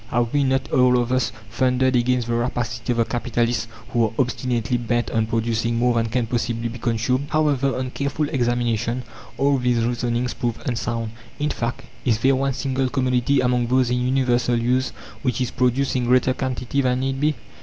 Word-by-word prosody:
Have 120 -1 0
we 145 -1 +3
not, 135 0 0
all 125 -1 +4
of 120 0 0
us, 130 -3 +1 0.2
thundered 130 +1 +2
against 125 0 +2
the 120 - -1
rapacity 120 -1 -1
of 120 - 0
the 115 - +3
capitalists 120 -1 -1 0.2
who 115 -1 +2
are 110 - -2
obstinately 125 -2 0
bent 120 0 -1
on 110 -1 +1
producing 115 0 0
more 120 +1 +2
than 115 -1 +1
can 120 +1 0
possibly 115 0 -2
be 120 +1 -8
consumed! 125 +4 0
However, 145 -4 +1
on 130 0 -3
careful 140 +2 -1
examination 120 -1 0 0.3
all 140 +1 +2
these 120 -2 +1
reasonings 120 0 -1
prove 120 -2 -2
unsound. 115 -2 -2 0.3
In 150 +1 -1
fact, 120 +1 -3 0.2
Is 115 -4 +2
there 130 +4 +3
one 135 +1 0
single 135 -1 -1
commodity 130 +1 +1
among 125 -1 +1
those 125 0 +2
in 125 0 +1
universal 125 -2 +2
use 125 +2 +1 0.3
which 125 -3 -1
is 125 -1 -1
produced 125 +2 +1
in 125 -1 +1
greater 130 +1 +3
quantity 130 +1 -2
than 125 -1 +1
need 135 0 -2
be. 150 0 +2
125 Hz, 185 wpm, -22 LUFS, 120-130 Hz, 0.3 s, all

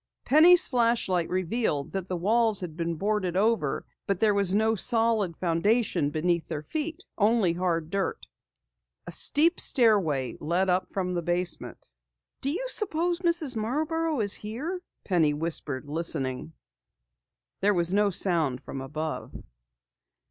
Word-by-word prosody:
Penny's 335 +5 +6
flashlight 230 -8 0
revealed 185 - -1
that 190 -1 -4
the 185 - -3
walls 220 +3 +2
had 170 -4 -6
been 170 0 -3
boarded 190 0 -1
over, 210 -8 0 0.2
but 195 -2 -1
there 215 -2 +3
was 200 -1 +3
no 220 +1 +2
solid 225 -5 +1
foundation 180 -1 +1
beneath 170 +2 -1
their 150 - -5
feet, 320 - -4 0.2
only 210 -3 +3
a 170 - -6
hard 165 -3 -1
dirt 200 - -1
floor. - - -26
A - - -8
steep 330 +4 +3
stairway 190 - +2
led 180 +4 0
up 180 +1 -1
from 180 -2 -2
the 175 - -1
basement. 175 +1 -2 0.5
"Do 275 - 0
you 385 +12 -2
suppose 350 -7 0
Mrs. 335 -7 +1
Marborough 305 +6 -1
is 205 -1 +3
here?" 285 - -5 0.2
Penny 160 -6 +1
whispered, 150 -3 -1
listening. 150 -2 -2 1.1
There 205 +1 +2
was 175 +1 +1
no 205 0 +3
sound 160 -9 +1
from 135 - -7
above. 155 +4 -5
195 Hz, 140 wpm, -27 LUFS, 170-235 Hz, 1.1 s, Penny's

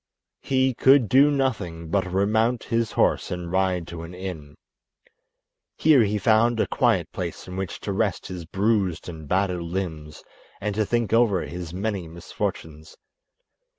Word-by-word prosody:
He 130 -1 +1
could 130 0 +5
do 135 +6 +5
nothing 105 - -2
but 95 -2 0
remount 110 +5 +1
his 115 -1 -1
horse - - +1
and 90 -1 -5
ride 95 -2 +1
to 85 -1 -7
an 85 +2 -9
inn. 90 -6 -7 1.2
Here 150 -5 +5
he 105 -1 +1
found 115 +2 +3
a - - +3
quiet - - +1
place - - -5
in 90 - -7
which 95 -2 -4
to 100 - -3
rest 100 -2 -1
his 90 -2 -6
bruised 95 -1 0
and 80 -3 -8
battered 90 +1 0
limbs 85 -4 -5 0.4
and 105 +1 -2
to 105 0 0
think 120 -2 0
over 115 -6 +3
his 85 -1 -7
many 95 -1 -3
misfortunes. 80 -2 -6
95 Hz, 150 wpm, -24 LUFS, 85-115 Hz, 1.2 s, could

